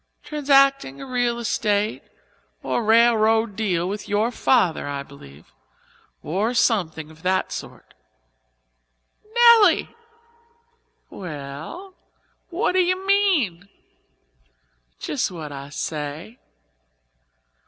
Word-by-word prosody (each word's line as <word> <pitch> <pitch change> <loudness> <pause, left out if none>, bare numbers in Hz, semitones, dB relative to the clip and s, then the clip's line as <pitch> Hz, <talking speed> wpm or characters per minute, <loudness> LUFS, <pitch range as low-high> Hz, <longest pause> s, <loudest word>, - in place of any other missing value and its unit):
"Transacting 275 - +2
a - - -7
real 245 -2 -1
estate 210 - -1 0.6
or 240 - -1
railroad 225 -1 +3
deal 180 -5 -1
with 205 +2 -6
your 210 +3 +1
father, 185 - +1
I 140 -1 -4
believe, 75 - -16 0.7
or 210 +9 -1
something 160 -10 0
of 160 0 -18
that 185 +1 0
sort." - - -9 1.4
"Nelly!" 470 -7 +6 1.2
"Well?" 160 - -8 0.6
"What 360 +4 0
do 370 - +1
you 370 +1 +1
mean?" 315 - +1 1.3
"Just 270 - -2
what 160 -5 -8
I 140 0 -8
say." 155 - -6
215 Hz, 90 wpm, -22 LUFS, -, 1.4 s, Nelly